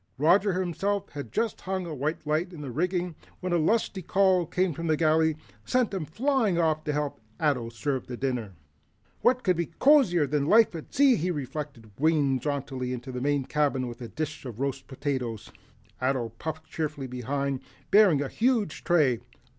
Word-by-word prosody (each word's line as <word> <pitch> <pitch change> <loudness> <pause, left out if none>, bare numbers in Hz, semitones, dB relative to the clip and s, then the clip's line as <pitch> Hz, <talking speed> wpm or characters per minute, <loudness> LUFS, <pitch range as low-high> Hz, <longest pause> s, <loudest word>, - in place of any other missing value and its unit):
Roger 180 +6 +3
himself 195 +3 -1
had 140 -7 -7
just 225 - -1
hung 190 -1 -3
a 165 - -5
white 150 +3 -3
light 155 +4 0
in 155 - -8
the 140 -3 -5
rigging 180 +4 -1 0.3
when 180 -1 -2
a - - +4
lusty 200 +3 +1
call 185 -1 +3
from 170 -3 -1
the 155 -1 +2
galley 160 0 +3 0.3
sent 250 -5 +1
him 185 -5 -2
flying 225 - +1
off 160 -2 +1
to 150 - -1
help 145 -5 -2 0.2
Ato 140 -7 +1
serve 130 +3 -3
the 125 - -6
dinner. 120 -7 -2 0.7
"What 250 0 +3
could 185 -2 +3
be 170 -1 -1
cozier 195 - +4
than 145 0 0
a - - -2
life 225 -2 +6
at 160 -2 -8
sea?" 270 -3 +5
he 180 +1 -1
reflected, 140 -6 -5
winging 145 -4 +3
jauntily 130 -2 -3
into 125 +1 -6
the 125 0 -4
main 140 -1 +1
cabin 140 -4 0
with 120 +1 -8
a 120 - -5
dish 155 +4 -5
of 120 -4 -8
roast 135 -1 -2
potatoes. 125 -5 -3 0.5
Ato 130 -3 0
puffed 155 +7 -6
cheerfully 150 -3 -4
behind, 135 +2 -2 0.3
bearing 190 -9 +6
a - - -3
huge 225 - 0
tray. 145 -9 +3
155 Hz, 180 wpm, -27 LUFS, 135-180 Hz, 0.7 s, life